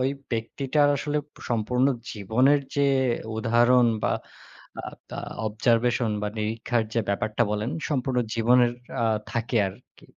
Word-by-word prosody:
ওই 130 Hz, +1 st, +2 dB, 0.2 s
ব্যক্তিটার 135 Hz, +6 st, +1 dB
আসলে 150 Hz, +1 st, -1 dB, 0.3 s
সম্পূর্ণ 125 Hz, +3 st, +2 dB, 0.3 s
জীবনের 125 Hz, +8 st, +3 dB
যে 140 Hz, -1 st, +3 dB, 0.5 s
উদাহরণ 120 Hz, +2 st, +4 dB, 0.2 s
বা -, -, +2 dB, 0.7 s
আ -, -, -11 dB, 0.3 s
তার -, -, -5 dB, 0.2 s
observation 115 Hz, +2 st, +1 dB
বা 105 Hz, -, 0 dB
নিরীক্ষার 110 Hz, +2 st, 0 dB
যে 115 Hz, -, +3 dB
ব্যাপারটা 105 Hz, +3 st, 0 dB
বলেন 105 Hz, +3 st, -1 dB, 0.2 s
সম্পূর্ণ 130 Hz, -2 st, 0 dB, 0.2 s
জীবনের 120 Hz, +1 st, +4 dB, 0.3 s
আ -, -, +3 dB, 0.3 s
থাকে 115 Hz, +1 st, -1 dB
আরকি। 105 Hz, +7 st, -16 dB
120 Hz, 125 wpm, -25 LUFS, 110-125 Hz, 0.7 s, উদাহরণ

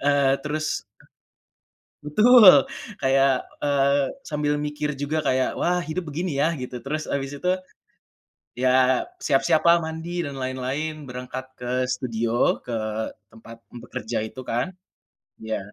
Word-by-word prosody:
eee, 140 Hz, -1 st, +4 dB
terus 155 Hz, +2 st, -2 dB, 1.2 s
Betul. 190 Hz, -, +7 dB, 0.3 s
Kayak, 135 Hz, -1 st, +2 dB, 0.2 s
eee, 140 Hz, 0 st, +2 dB, 0.2 s
sambil 150 Hz, -1 st, -1 dB
mikir 150 Hz, 0 st, -3 dB
juga 150 Hz, +2 st, -1 dB
kayak, 130 Hz, -2 st, +1 dB
wah 180 Hz, +1 st, +1 dB
hidup 160 Hz, +2 st, -4 dB
begini 155 Hz, -2 st, -2 dB
ya? 155 Hz, +3 st, +3 dB
Gitu. 125 Hz, -2 st, -6 dB
Terus 155 Hz, +3 st, -3 dB
habis 135 Hz, -1 st, -2 dB
itu, 180 Hz, +5 st, +1 dB, 1.0 s
ya 130 Hz, +1 st, +3 dB
siap-siap 135 Hz, -, +2 dB
lah, 170 Hz, 0 st, +6 dB
mandi 160 Hz, +2 st, -4 dB
dan 140 Hz, -4 st, -5 dB
lain-lain. 135 Hz, +4 st, -3 dB
Berangkat 125 Hz, +1 st, -6 dB
ke 125 Hz, +1 st, -1 dB
studio, 115 Hz, -2 st, 0 dB
ke 110 Hz, -3 st, -3 dB, 0.4 s
tempat 115 Hz, +1 st, -14 dB
bekerja 120 Hz, -1 st, -5 dB
itu 130 Hz, +4 st, -8 dB
kan 125 Hz, +9 st, -2 dB, 0.7 s
ya. 110 Hz, -1 st, -2 dB
140 Hz, 120 wpm, -24 LUFS, 125-155 Hz, 1.2 s, Betul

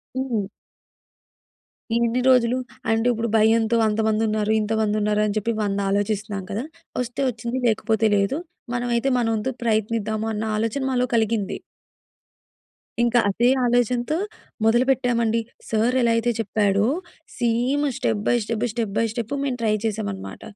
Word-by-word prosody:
హ్మ్. 245 Hz, -7 st, -1 dB, 1.5 s
"ఇన్ని 235 Hz, +1 st, +1 dB
రోజులు, 250 Hz, -1 st, +4 dB, 0.3 s
అంటే 225 Hz, +2 st, +2 dB
ఇప్పుడు 235 Hz, 0 st, -2 dB
భయంతో 225 Hz, +1 st, +3 dB
అంతమందున్నారు, 215 Hz, 0 st, +1 dB
ఇంతమందున్నారు 210 Hz, -1 st, +1 dB
అని 210 Hz, 0 st, -1 dB
చెప్పి 215 Hz, +2 st, 0 dB
వంద 200 Hz, -1 st, -1 dB
ఆలోచిస్తున్నాం 205 Hz, 0 st, -1 dB
కదా! 215 Hz, +5 st, -2 dB, 0.4 s
ఒస్తే 245 Hz, +2 st, -4 dB
ఒచ్చింది, 235 Hz, +2 st, -4 dB
లేకపోతే 220 Hz, 0 st, +2 dB
లేదు. 200 Hz, +9 st, +1 dB, 0.4 s
మనమైతే 240 Hz, +1 st, 0 dB
మనోంతు 225 Hz, 0 st, 0 dB
ప్రయత్నిద్దాము" 220 Hz, -1 st, 0 dB
అన్న 210 Hz, +1 st, -3 dB
ఆలోచన 225 Hz, +5 st, -1 dB
మాలో 250 Hz, -1 st, +2 dB
కలిగింది. 220 Hz, -3 st, 0 dB, 1.5 s
ఇంక 240 Hz, 0 st, +1 dB
అదే 235 Hz, +5 st, +2 dB, 0.2 s
ఆలోచనతో 245 Hz, +4 st, +1 dB, 0.5 s
మొదలుపెట్టామండి. 235 Hz, -1 st, +2 dB, 0.3 s
సార్ 225 Hz, +3 st, +1 dB
ఎలా 235 Hz, -1 st, +3 dB
అయితే 230 Hz, +1 st, +1 dB
చెప్పాడో 205 Hz, -1 st, +1 dB, 0.5 s
same 245 Hz, +4 st, +1 dB
step 215 Hz, -5 st, 0 dB
by -, -, +4 dB
step, 225 Hz, +1 st, -2 dB
step 220 Hz, -3 st, -3 dB
by 230 Hz, -, +3 dB
step 230 Hz, +3 st, -4 dB
మేము 265 Hz, -3 st, -1 dB
ట్రై 220 Hz, -2 st, +2 dB
చేసామనమాట. 205 Hz, -3 st, -4 dB
225 Hz, 125 wpm, -23 LUFS, 215-240 Hz, 1.5 s, రోజులు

